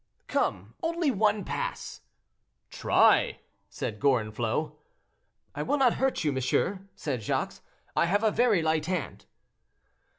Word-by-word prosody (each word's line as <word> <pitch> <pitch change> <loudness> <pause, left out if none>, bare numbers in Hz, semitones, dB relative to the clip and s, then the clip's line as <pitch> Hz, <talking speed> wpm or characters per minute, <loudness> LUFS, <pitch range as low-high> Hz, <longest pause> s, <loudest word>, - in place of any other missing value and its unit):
"Come, - - -1
only 335 -3 +1
one 210 -2 +2
pass." - - -4 0.7
"Try," - - +3 0.3
said 105 -1 -5
Gorenflot. 120 +1 0 0.8
"I - - -4
will 290 - 0
not 260 -4 +4
hurt 265 -7 +1
you, 150 - +2
monsieur," 165 +9 -1
said 130 -6 -3
Jacques, 105 - -2 0.4
"I 170 - +3
have 205 +5 +1
a 220 - +4
very 220 -9 +3
light 155 -1 +1
hand." 180 -6 -4
180 Hz, 125 wpm, -28 LUFS, 135-220 Hz, 0.8 s, not